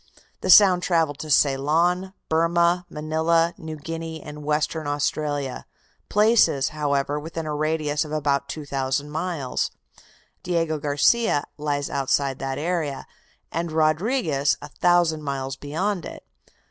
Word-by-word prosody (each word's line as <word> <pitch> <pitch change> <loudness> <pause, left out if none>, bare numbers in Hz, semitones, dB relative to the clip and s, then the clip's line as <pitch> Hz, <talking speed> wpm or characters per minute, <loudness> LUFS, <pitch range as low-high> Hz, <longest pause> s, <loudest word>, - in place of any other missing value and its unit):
The 185 - -4
sound 185 -2 +8
travelled 165 -5 +1
to 155 - -6
Ceylon, 160 +7 +2
Burmah, 170 +2 +2
Manila, 160 +2 +1
New 160 -1 -6
Guinea 165 +1 -6
and 150 0 -9
Western 150 +1 -1
Australia, 145 -2 -2 0.4
places, 210 - +4
however, 145 -1 -1
within 160 +1 -6
a 155 - -3
radius 150 -1 0
of 150 - -9
about 140 -2 0
2,000 140 -1 -3
miles; 155 -5 -2
out - - -28 0.4
Diego 165 -3 -1
Garcia 145 +5 +2
lies 145 -1 -2
outside 140 0 0
that 135 0 -3
area, 155 -3 -2 0.5
and 165 0 -2
Rodriguez 155 - +1
a - - -10
thousand 175 -3 +2
miles 135 -2 -3
beyond 165 +7 -2
it. - - -11
155 Hz, 125 wpm, -24 LUFS, 145-170 Hz, 0.5 s, sound